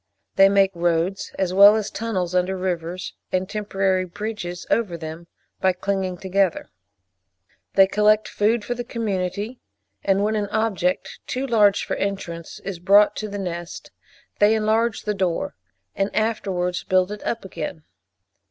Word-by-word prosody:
They 195 0 +7
make 195 -1 +4
roads 175 +2 0
as 185 -2 0
well 200 +2 +8
as 215 -2 -2
tunnels 190 -5 -2
under 180 +1 +1
rivers, 180 -1 -3 0.2
and 185 0 0
temporary 195 -3 0
bridges 185 -2 -5
over 200 -7 +1
them, 160 +1 -8 0.3
by 190 -1 +3
clinging 190 0 -2
together. 190 0 0 1.0
They 195 - +8
collect 210 +2 +3
food 215 +1 +1
for 245 - -1
the 245 0 -5
community, 210 -1 -3 0.4
and 195 +1 +2
when 215 +1 +1
an 205 -1 -1
object, 205 -5 -1
too 260 +2 -2
large 210 -5 +3
for - - -2
entrance, 175 -4 -4
is 195 -3 -5
brought 200 +3 +5
to 215 - -4
the 205 - -5
nest, 175 -3 -6 0.5
they 210 +2 +5
enlarge 220 +1 +1
the 210 - -1
door, 185 -4 -1 0.4
and 195 +1 0
afterwards 190 -5 -1
build 185 +1 +2
it 210 - -7
up 230 -4 -3
again. 170 -3 -6
195 Hz, 150 wpm, -23 LUFS, 180-210 Hz, 1.0 s, well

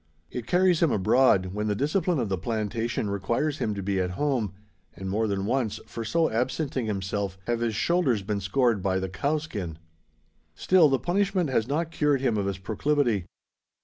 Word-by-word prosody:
It 125 -1 -5
carries 180 -2 +3
him 165 -5 +4
abroad, 95 -2 +3
when 105 +1 -2
the 105 - 0
discipline 160 - +1
of 120 - 0
the 95 - 0
plantation 110 +1 -2
requires 120 +9 -1
him 105 - -1
to 100 - -4
be 95 0 0
at 90 -1 0
home; 130 -9 0 0.4
and 95 +2 -6
more 110 +4 0
than 100 -1 -1
once, 110 -2 0
for 115 - -6
so 165 +8 +2
absenting 130 +1 -1
himself, 100 -1 -2
have 120 -1 0
his 115 -2 -1
shoulders 135 - +1
been 100 0 -2
scored 115 +2 +1
by 95 0 +1
the 95 0 -2
"cowskin." 110 - -2 0.8
Still 180 -5 +5
the 135 - +3
punishment 185 -1 0
has 115 -3 +1
not 160 +4 -1
cured 150 -4 +2
him 125 -5 +1
of 100 -2 0
his 100 -1 -2
proclivity. 110 0 0
115 Hz, 180 wpm, -26 LUFS, 100-145 Hz, 0.8 s, Still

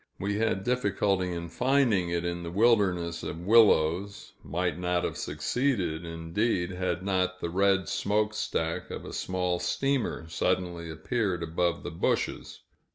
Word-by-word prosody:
We 100 +2 -1
had 110 -4 0
difficulty 100 -6 +1
in 85 -1 -5
finding 120 - +2
it 85 0 -1
in 85 0 -2
the 85 - -5
wilderness 95 -5 +2
of 85 - -5
willows 100 -2 +3
might 90 +2 -2
not 90 0 0
have - - -2
succeeded, 90 - -1
indeed, 85 +3 -1
had 90 -1 -2
not 95 -1 0
the 85 - -3
red 95 0 +2
smokestack 105 -5 -1
of - - -6
a - - -8
small 90 -1 -1
steamer 135 -11 -1
suddenly 85 0 -1
appeared 90 +3 -1
above 85 +1 -1
the - - -5
bushes. 80 - -2
90 Hz, 140 wpm, -28 LUFS, 85-105 Hz, -, willows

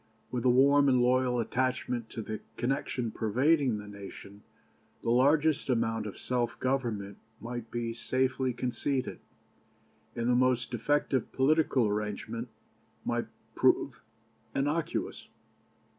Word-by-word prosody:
With 125 -1 -2
a - - +6
warm 140 +3 +5
and 125 -1 +4
loyal 125 0 +3
attachment 125 -1 -1
to 115 - -5
the 110 0 -5 0.2
connection 125 -2 -1
pervading 130 +3 +2
the 105 0 -8
nation, 100 0 -10 0.6
the 115 - +1
largest 145 +4 +3
amount 115 -3 0
of 100 - -7
self 120 -2 -1
government 115 -7 -2 0.2
might 120 +1 -6
be 115 -1 -3
safely 130 +2 0
conceded, 130 +2 -2 1.0
and 120 0 -1
the 125 - +4
most 125 -1 +2
defective 130 +2 0
political 140 -2 +3
arrangement 105 +3 -3 0.6
might - - -1 0.3
prove - - +2 0.5
innocuous. 150 +4 -1
125 Hz, 115 wpm, -30 LUFS, 115-130 Hz, 1.0 s, a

